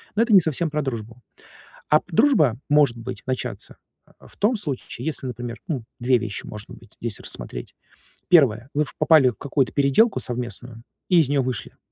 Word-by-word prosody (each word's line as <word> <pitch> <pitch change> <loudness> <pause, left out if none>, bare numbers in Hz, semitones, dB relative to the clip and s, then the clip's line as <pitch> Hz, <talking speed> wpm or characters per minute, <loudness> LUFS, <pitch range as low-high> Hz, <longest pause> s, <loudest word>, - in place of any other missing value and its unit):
Но 215 - +3
это 230 0 +1
не 195 - +10
совсем 160 +1 0
про 150 0 -1
дружбу. 115 -2 -6 0.7
А 150 - +5
п - - -33
дружба 165 - +4
может 145 -5 +4
быть 120 +2 -7
начаться, 130 -1 -4 0.4
а, - - -17
в - - -19
том 225 +4 +2
случае, 140 - -6
если, 155 -4 -3
например, 120 -1 -6
ну, 135 -9 -3
2 125 +1 +3
вещи 110 -4 -5
может 105 0 -8
быть 110 - -14
здесь 115 -3 -3
рассмотреть. - - -5 0.5
1 130 -7 +4
вы 150 +1 +2
в - - -12
попали 155 -4 +5
в - - -11
какую-то 140 -2 0
переделку 140 - +3
совместную 120 -1 -5 0.3
и 175 -2 +6
из 150 - +2
неё 140 -1 +2
вышли. 125 -3 -5
130 Hz, 185 wpm, -23 LUFS, 120-155 Hz, 0.7 s, не